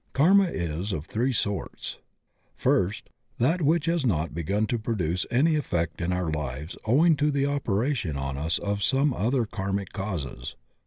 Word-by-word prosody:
Karma 190 Hz, +8 st, +5 dB
is 85 Hz, -, -3 dB
of 75 Hz, -5 st, -3 dB
three 120 Hz, +8 st, 0 dB
sorts: 100 Hz, -5 st, -3 dB, 0.6 s
First 95 Hz, +3 st, 0 dB
— -, -, -39 dB
^that 160 Hz, +9 st, +2 dB
which 155 Hz, +1 st, +3 dB
has 170 Hz, -2 st, +1 dB
not 85 Hz, -10 st, 0 dB
begun 95 Hz, +7 st, 0 dB
to 120 Hz, +2 st, -1 dB
produce 90 Hz, -6 st, -1 dB
any 155 Hz, +6 st, +3 dB
effect 85 Hz, -, -1 dB
in 85 Hz, +1 st, 0 dB
our 90 Hz, -3 st, -1 dB
lives 75 Hz, +1 st, -4 dB
owing 155 Hz, +9 st, +5 dB
to 150 Hz, +1 st, +2 dB
the 140 Hz, -1 st, +1 dB
operation 120 Hz, -, 0 dB
on 70 Hz, 0 st, -3 dB
us 75 Hz, +3 st, 0 dB
of 100 Hz, 0 st, -2 dB
some 135 Hz, +5 st, +2 dB
other 120 Hz, +3 st, +1 dB
karmic 100 Hz, -1 st, -3 dB
causes. 80 Hz, -, -4 dB
100 Hz, 165 wpm, -27 LUFS, 85-140 Hz, 0.6 s, Karma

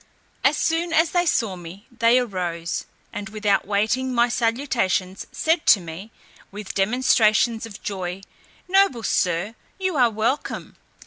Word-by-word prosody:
As -, -, +3 dB
soon 330 Hz, +1 st, 0 dB
as 325 Hz, 0 st, +3 dB
they 350 Hz, -1 st, +1 dB
saw 220 Hz, -, +1 dB
me 180 Hz, +4 st, -11 dB
they 235 Hz, +1 st, +3 dB
arose, 180 Hz, -8 st, -2 dB, 0.3 s
and 205 Hz, +1 st, -6 dB
without 210 Hz, -3 st, 0 dB
waiting 220 Hz, +6 st, 0 dB
my 240 Hz, 0 st, +3 dB
salutations, 230 Hz, -7 st, -1 dB
said 320 Hz, 0 st, 0 dB
to 210 Hz, -, +7 dB
me, 175 Hz, +5 st, -9 dB, 0.4 s
with 205 Hz, 0 st, -7 dB
demonstrations 225 Hz, +1 st, +2 dB
of 205 Hz, -, -12 dB
joy, 185 Hz, -1 st, -4 dB, 0.5 s
"Noble 375 Hz, -, +3 dB
Sir, 180 Hz, +1 st, 0 dB, 0.2 s
you 375 Hz, -4 st, -1 dB
are 245 Hz, -3 st, +5 dB
welcome." 225 Hz, +6 st, -2 dB
220 Hz, 135 wpm, -23 LUFS, 195-255 Hz, 0.5 s, to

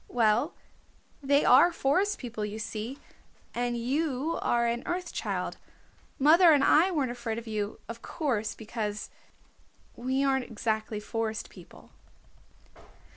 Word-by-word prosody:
"Well, 235 Hz, +5 st, +2 dB, 0.7 s
they 280 Hz, +1 st, +3 dB
are 350 Hz, -, +7 dB
Forest 375 Hz, +8 st, +1 dB
People, 235 Hz, -4 st, -5 dB
you 210 Hz, +1 st, -4 dB
see, 225 Hz, +3 st, -5 dB, 0.6 s
and 240 Hz, 0 st, -1 dB
you 280 Hz, +5 st, -1 dB
are 235 Hz, 0 st, +2 dB
an 235 Hz, +1 st, 0 dB
Earth 355 Hz, 0 st, -3 dB
Child. -, -, -3 dB, 0.6 s
Mother 320 Hz, +4 st, +7 dB
and 285 Hz, -2 st, +4 dB
I 330 Hz, +7 st, +5 dB
weren't 285 Hz, -9 st, 0 dB
afraid 235 Hz, -2 st, -4 dB
of 235 Hz, -, -6 dB
you, 215 Hz, -2 st, -3 dB
of 230 Hz, 0 st, -8 dB
course, 230 Hz, -10 st, -2 dB
because, 215 Hz, -2 st, -5 dB, 0.8 s
we 260 Hz, +3 st, -1 dB
aren't 265 Hz, -2 st, +1 dB
exactly 220 Hz, -1 st, -2 dB
Forest 220 Hz, +1 st, -3 dB
People." -, -, -15 dB
240 Hz, 130 wpm, -28 LUFS, 220-285 Hz, 0.8 s, are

